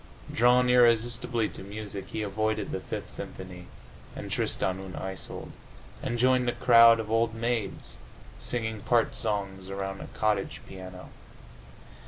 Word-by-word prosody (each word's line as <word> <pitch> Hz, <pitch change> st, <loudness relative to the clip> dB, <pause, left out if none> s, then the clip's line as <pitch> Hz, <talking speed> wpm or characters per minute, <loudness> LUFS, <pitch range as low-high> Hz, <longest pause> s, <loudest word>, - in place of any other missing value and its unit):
Drawn 125 Hz, +2 st, +5 dB
irresistibly 120 Hz, -1 st, +3 dB
to -, -, -10 dB
music, 100 Hz, 0 st, -7 dB
he 110 Hz, -, -3 dB
avoided 110 Hz, +2 st, -1 dB
the -, -, -2 dB
Fifth -, -, -5 dB
Symphony 90 Hz, -1 st, -8 dB, 0.5 s
and -, -, -6 dB
"Tristan 95 Hz, 0 st, 0 dB
und 95 Hz, -1 st, -8 dB
Isolde," 95 Hz, -2 st, -6 dB, 0.5 s
and 120 Hz, -, -2 dB
joined 125 Hz, 0 st, +3 dB
a -, -, 0 dB
crowd 115 Hz, -1 st, +7 dB
of 110 Hz, -1 st, -4 dB
old 115 Hz, 0 st, +2 dB
maids 115 Hz, -3 st, -2 dB, 0.4 s
singing 110 Hz, -3 st, -2 dB
part 120 Hz, +2 st, +2 dB
songs 100 Hz, -4 st, -2 dB
around 95 Hz, 0 st, -4 dB
a -, -, -7 dB
cottage 105 Hz, -3 st, -1 dB
piano. 95 Hz, -1 st, -9 dB
110 Hz, 135 wpm, -28 LUFS, 95-120 Hz, 0.5 s, crowd